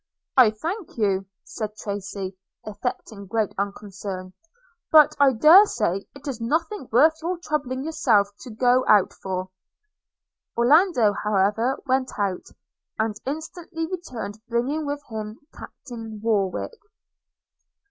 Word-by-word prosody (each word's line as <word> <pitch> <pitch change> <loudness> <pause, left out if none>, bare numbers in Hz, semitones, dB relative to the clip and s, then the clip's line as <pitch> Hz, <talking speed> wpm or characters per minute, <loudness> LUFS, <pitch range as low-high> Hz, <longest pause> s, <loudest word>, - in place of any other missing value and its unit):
'I 255 -4 +7
thank 355 - -4
you,' 195 -3 +1 0.3
cried 215 -1 -3
Tracy, 200 -2 -5 0.3
affecting 205 -1 -5
great 215 +1 -1
unconcern, 195 -2 -5 0.6
'but 305 -2 +7
I 280 -1 +6
dare 320 - +7
say 195 - -1
it 280 +1 -11
is 250 -4 -4
nothing 320 - -1
worth 315 +7 +5
your 350 +3 -2
troubling 275 -6 -3
yourself 265 -11 +2
to 255 - -10
go 245 +3 +3
out 205 -3 +5
for.' 185 -1 -5 1.1
Orlando, 250 - +4
however, 210 +5 +1
went 260 -1 0
out, 200 -3 -2 0.5
and 220 0 0
instantly 325 +3 -5
returned 245 - -6
bringing 275 +6 -1
with 290 0 -3
him 215 -1 -6 0.2
Captain 225 -4 -9
Warwick. 215 - -1
230 Hz, 115 wpm, -24 LUFS, 205-295 Hz, 1.1 s, I